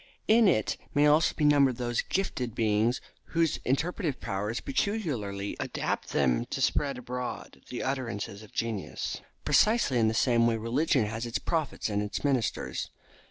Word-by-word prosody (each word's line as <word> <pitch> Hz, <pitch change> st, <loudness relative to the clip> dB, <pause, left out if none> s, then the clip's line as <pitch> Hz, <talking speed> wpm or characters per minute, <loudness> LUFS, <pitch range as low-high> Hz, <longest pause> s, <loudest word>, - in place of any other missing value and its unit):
In 225 Hz, 0 st, +6 dB
it 110 Hz, -, +2 dB, 0.2 s
may 145 Hz, +1 st, +5 dB
also 150 Hz, +2 st, +4 dB
be 150 Hz, -, +1 dB
numbered 140 Hz, -4 st, +4 dB
those 120 Hz, -1 st, 0 dB
gifted 130 Hz, -, -2 dB
beings 110 Hz, +2 st, +2 dB, 0.4 s
whose 165 Hz, -3 st, +3 dB
interpretative 145 Hz, +1 st, -1 dB
powers 105 Hz, +4 st, -2 dB
peculiarly 140 Hz, -, -2 dB
adapt -, -, -2 dB
them -, -, +2 dB
to -, -, -4 dB
spread 140 Hz, -3 st, +1 dB
abroad 125 Hz, -, -6 dB
the 125 Hz, -, -4 dB
utterances 115 Hz, -7 st, -3 dB
of 110 Hz, -, -14 dB
genius. 115 Hz, -4 st, -3 dB, 0.2 s
Precisely 215 Hz, -, +4 dB
in 110 Hz, -, +4 dB
the 110 Hz, -, 0 dB
same 115 Hz, 0 st, +3 dB
way 115 Hz, -1 st, +1 dB
religion 120 Hz, +2 st, +1 dB
has 110 Hz, +2 st, -4 dB
its 115 Hz, -, -1 dB
prophets 160 Hz, -4 st, -2 dB
and 105 Hz, -1 st, 0 dB
its 105 Hz, 0 st, -4 dB
ministers. 135 Hz, -6 st, -1 dB
125 Hz, 155 wpm, -29 LUFS, 110-150 Hz, 0.4 s, In